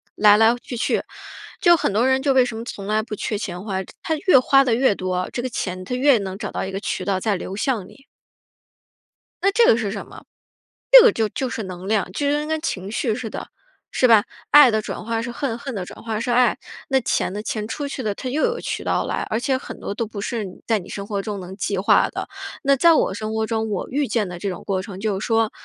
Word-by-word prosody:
来 210 -1 +6
来 225 +2 +5
去 245 - -7
去， 235 - 0 0.6
就 345 -3 +6
很 205 - -1
多 230 +5 +2
人 265 0 +2
就 280 -2 +3
为 260 -1 +5
什 240 -3 -5
么 225 - -5
从 200 -5 -7
来 215 +1 +1
不 215 -1 -6
缺 210 +1 -3
钱 180 -3 -5
花， 190 -3 -3 0.2
他 320 - -1
越 365 -9 +7
花 275 +2 +5
得 250 -4 +1
越 245 -2 +3
多， 185 -1 -2
这 245 - -4
个 255 - -2
钱 185 -5 -4
它 225 - -5
越 270 0 +4
能 190 -2 -5
找 205 -1 -5
到 - - -3
一 190 - -5
个 195 - -3
渠 - - -3
道 195 -2 0
再 210 +1 0
流 185 +1 -6
向 215 -3 -1
你。 - - -16 1.5
那 395 - +4
这 465 +3 +4
个 225 - +5
是 215 -4 -2
什 200 -1 -5
么？ - - -13 0.7
这 - - +12
个 470 - +7
就 220 - -1
就 260 +5 -3
是 225 - -4
能 185 -1 -8
量， 210 -3 0
就 285 +9 -2
跟 295 +1 0
跟 315 0 -1
情 195 - -4
绪 225 0 0
似 230 0 -5
的， - - -7 0.4
是 255 - +3
吧？ 225 -3 +6 0.3
爱 290 -4 +8
的 215 0 +1
转 215 - -6
化 225 0 -1
是 240 +1 -5
恨， 240 -1 -3
恨 265 +2 -6
的 190 -3 -4
转 - - -11
化 220 -2 -3
是 240 - -2
爱。 245 +1 +3 0.3
那 265 -1 +2
钱 220 - 0
呢？ 205 - -4
钱 215 -1 -3
出 285 +5 -4
去 275 - -5
的 210 -4 -2
它 255 - -5
又 295 +5 -1
有 475 0 +1
渠 - - -4
道 - - 0
来， - - -2
而 220 - 0
且 260 +1 0
很 - - -9
多 - - -4
都 225 +2 -3
不 205 -1 -7
是 225 0 -3 0.2
在 225 -2 +2
你 180 - -12
生 200 - -5
活 200 -1 -3
中 205 -1 -5
能 185 +1 -8
计 200 0 -2
划 190 - +3
的。 - - -5 0.4
那 275 0 +4
在 335 +5 +5
我 300 - +2
生 215 +2 -4
活 220 0 0
中， 220 0 -2
我 200 -3 -3
遇 285 +1 0
见 220 -5 0
的 175 -1 -7
这 200 - -2
种 180 - -6
过 190 -2 -1
程 190 0 -9
就 200 -2 -1
是 - - -4
说， 225 -2 +2
220 Hz, 280 characters per minute, -22 LUFS, 200-255 Hz, 1.5 s, 这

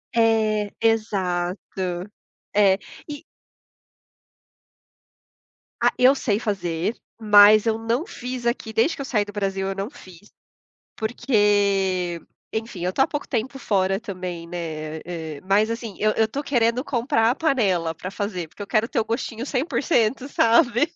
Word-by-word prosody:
É, 220 -2 +2
exato. 185 -4 -1 0.5
É. 195 -2 +4 0.3
E 290 -1 -7 2.6
Ah, - - +4
eu 255 +2 +6
sei 210 -6 0
fazer, 190 -2 -2 0.2
mas 210 0 +7
eu 225 -1 +1
não 230 +7 -1
fiz 250 - -6
aqui, 235 -2 -2
desde 265 +10 +2
que - - -5
eu - - -4
saí 210 -5 0
do 205 - -10
Brasil, 195 -1 -2
eu 195 - -3
não 195 +2 -3
fiz, 190 - -16 0.6
porque, 200 -6 +1 0.3
enfim, 220 -5 -4
eu 180 - 0
tô - - +1
há 270 - +4
pouco 295 -2 -4
tempo 255 +2 -2
fora 195 -5 0
também, 180 -6 -6
né, 160 -3 -5
eh, 160 -4 -6
mas 210 +3 +3
assim, 230 -3 -5
eu 215 0 +3
eu 220 0 +2
tô 275 +6 -4
querendo 240 -2 +1
comprar 235 -4 +1
a 255 - -2
panela 195 - +1
pra 185 +3 -7
fazer, 195 -5 -4
porque 205 - -13
eu 200 - -6
quero 220 +1 +1
ter 255 - 0
o 220 - 0
gostinho 230 0 -3
100%, 270 -3 0
sabe. 240 +3 +3
215 Hz, 150 wpm, -23 LUFS, 190-235 Hz, 2.6 s, mas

